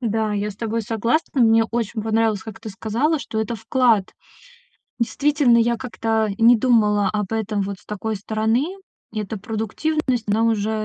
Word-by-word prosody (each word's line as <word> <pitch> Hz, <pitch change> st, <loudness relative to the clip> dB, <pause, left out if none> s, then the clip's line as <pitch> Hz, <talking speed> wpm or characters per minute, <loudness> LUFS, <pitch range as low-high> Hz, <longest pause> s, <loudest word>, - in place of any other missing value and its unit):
Да, 220 Hz, -2 st, -1 dB
я 205 Hz, +1 st, -1 dB
с 195 Hz, -, -12 dB
тобой 230 Hz, +1 st, -2 dB
согласна. 235 Hz, +6 st, 0 dB
Мне 225 Hz, 0 st, +5 dB
очень 230 Hz, -1 st, -3 dB
понравилось, 220 Hz, -2 st, +1 dB
как 220 Hz, -3 st, -9 dB
ты 225 Hz, -, -7 dB
сказала, 230 Hz, +11 st, 0 dB
что 220 Hz, -5 st, -4 dB
это 220 Hz, +2 st, -2 dB
вклад. 225 Hz, -2 st, +2 dB, 0.9 s
Действительно, 280 Hz, 0 st, +2 dB
я 235 Hz, +1 st, +2 dB
как-то 225 Hz, -3 st, -1 dB
не 235 Hz, +2 st, +6 dB
думала 210 Hz, -4 st, +3 dB
об 210 Hz, -1 st, -3 dB
этом 215 Hz, -2 st, -1 dB
вот 195 Hz, 0 st, -5 dB
с -, -, -23 dB
такой 215 Hz, +1 st, -3 dB
стороны. 220 Hz, -, -1 dB, 0.4 s
И 215 Hz, -, -3 dB
эта 210 Hz, +1 st, -5 dB
продуктивность, 235 Hz, +5 st, -2 dB
она 220 Hz, +2 st, +2 dB
уже, 220 Hz, -2 st, +1 dB
225 Hz, 165 wpm, -22 LUFS, 210-235 Hz, 0.9 s, не